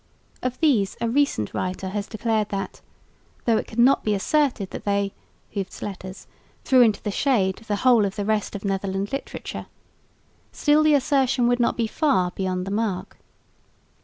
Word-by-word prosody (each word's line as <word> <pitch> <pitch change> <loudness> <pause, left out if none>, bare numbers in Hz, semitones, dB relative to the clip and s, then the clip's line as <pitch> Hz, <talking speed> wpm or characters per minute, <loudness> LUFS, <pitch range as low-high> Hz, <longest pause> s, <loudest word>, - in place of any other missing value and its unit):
Of 255 0 -3
these 240 -12 +2
a 235 - 0
recent 245 - +1
writer 185 +1 -3
has 205 +1 -3
declared 220 -1 -1
"that, 195 -1 -4 0.6
though 230 -2 +3
it - - -3
could 220 - -11
not 250 +3 +5
be 210 -1 +1
asserted 245 -2 0
that - - -7
they 200 -1 0 0.4
[Hooft's 195 -2 -4
letters] 190 -1 -7 0.4
threw 260 -1 +5
into 220 -4 +3
the 210 - -2
shade 200 -6 +1
the 220 -2 -3
whole 240 -4 +6
of 195 - -3
the 205 -2 -3
rest 215 -1 -1
of 200 - -6
Netherland 195 +1 -2
literature, 275 - -5 0.8
still 295 0 +3
the 310 -1 +5
assertion 270 -3 +2
would 245 0 +2
not 235 - +1
be 230 - +1
far 220 - +1
beyond 185 -1 -2
the 195 - -5
mark." 200 -3 -2
215 Hz, 170 wpm, -24 LUFS, 195-250 Hz, 0.8 s, whole